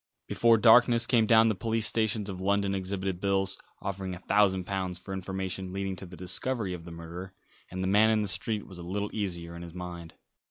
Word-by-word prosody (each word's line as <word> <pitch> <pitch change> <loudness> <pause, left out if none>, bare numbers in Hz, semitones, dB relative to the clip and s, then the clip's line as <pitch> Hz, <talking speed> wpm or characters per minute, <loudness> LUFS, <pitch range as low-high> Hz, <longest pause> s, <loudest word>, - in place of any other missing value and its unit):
Before 115 -1 +4
darkness 120 +1 +6
came 115 -3 +3
down 110 0 +6
the 110 - +2
police 110 +2 -1
stations 110 -2 +1
of 95 -2 -6
London 100 0 +1
exhibited 95 -1 -3
bills, 95 -1 +1 0.3
offering 95 -1 -4
a - - -10
thousand 100 -2 +2
pounds 95 -1 -3
for 95 +2 -8
information 95 0 -4
leading 95 -1 -3
to 95 - -8
the 90 0 -11
discovery 100 +3 -1
of 85 -2 -8
the 85 - -9
murderer, 85 +3 -8 0.4
and 95 +1 -4
the - - 0
man 105 +3 +5
in 110 -1 +2
the - - -2
street 105 +2 -1
was 95 -3 -12
a - - -7
little 100 +4 -3
easier 85 -5 -4
in 85 - -8
his 85 0 -9
mind. 85 -2 -7
95 Hz, 210 wpm, -29 LUFS, 90-105 Hz, 0.4 s, darkness